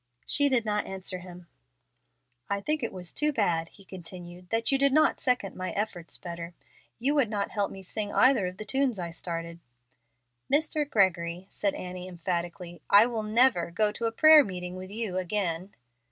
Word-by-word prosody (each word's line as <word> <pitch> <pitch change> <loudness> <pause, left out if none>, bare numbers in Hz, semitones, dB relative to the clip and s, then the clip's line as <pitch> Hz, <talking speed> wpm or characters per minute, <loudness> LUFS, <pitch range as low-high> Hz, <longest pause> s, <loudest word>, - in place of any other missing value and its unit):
She 285 -1 +4
did 245 -4 +2
not 210 -1 0
answer 190 -1 -4
him. 180 -1 -12 1.0
"I 200 0 0
think 305 +9 -1
it 235 - -2
was 180 -2 -3
too 300 0 +1
bad," 170 - 0
he 195 - -19
continued, 180 -1 -10
"that 225 +2 +2
you 275 - +2
did 280 0 +4
not 310 +3 +3
second 250 -7 0
my 185 0 -4
efforts 200 -5 -4
better. 170 0 -8 0.4
You 265 +5 +1
would 280 -7 +2
not 205 -2 -2
help 205 -2 -1
me 195 - -10
sing 205 +2 -4
either 255 -8 +4
of 180 +1 -7
the 215 - -7
tunes 265 0 0
I 170 -2 -4
started." 170 0 -4 0.9
"Mr. 300 0 +1
Gregory," 180 - +1
said 200 -1 -1
Annie, 180 0 -7
emphatically, 175 -1 -5
"I 205 +2 +8
will 235 -2 -2
never 215 -5 +3
go 210 +4 +1
to 230 +2 -3
a - - -2
prayer 310 +5 +8
meeting 180 -4 -6
with 185 0 -8
you 210 -3 -3
again." 185 -1 -2
195 Hz, 180 wpm, -28 LUFS, 180-230 Hz, 1.0 s, I